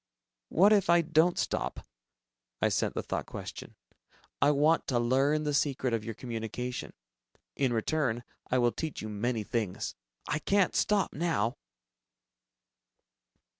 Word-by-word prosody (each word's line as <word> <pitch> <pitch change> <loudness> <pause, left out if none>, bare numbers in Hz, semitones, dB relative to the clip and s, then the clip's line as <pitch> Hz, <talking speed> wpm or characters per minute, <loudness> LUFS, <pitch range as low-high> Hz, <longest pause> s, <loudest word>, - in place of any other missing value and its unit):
"What 200 +5 +5
if 200 -5 +3
I 170 0 +6
don't 165 +2 +3
stop?" - - -2 0.7
I - - +3
sent - - 0
the - - -2
thought - - -3
question, - - -8 0.7
"I 145 - +5
want 150 +3 +3
to 125 - +1
learn 135 +6 +2
the 150 -1 -1
secret 135 -4 +1
of 115 -2 0
your 115 -1 -5
communication. 120 +1 -5 0.6
In 135 -3 +1
return, 120 0 0 0.3
I 130 - +2
will 120 -1 +3
teach 160 -3 -5
you 110 - -4
many 110 +2 -1
things. 105 -3 -2 0.3
I 150 +1 0
can't 200 +3 +2
stop 205 -1 +2
now!" 145 -8 0
135 Hz, 135 wpm, -30 LUFS, 120-160 Hz, 0.7 s, I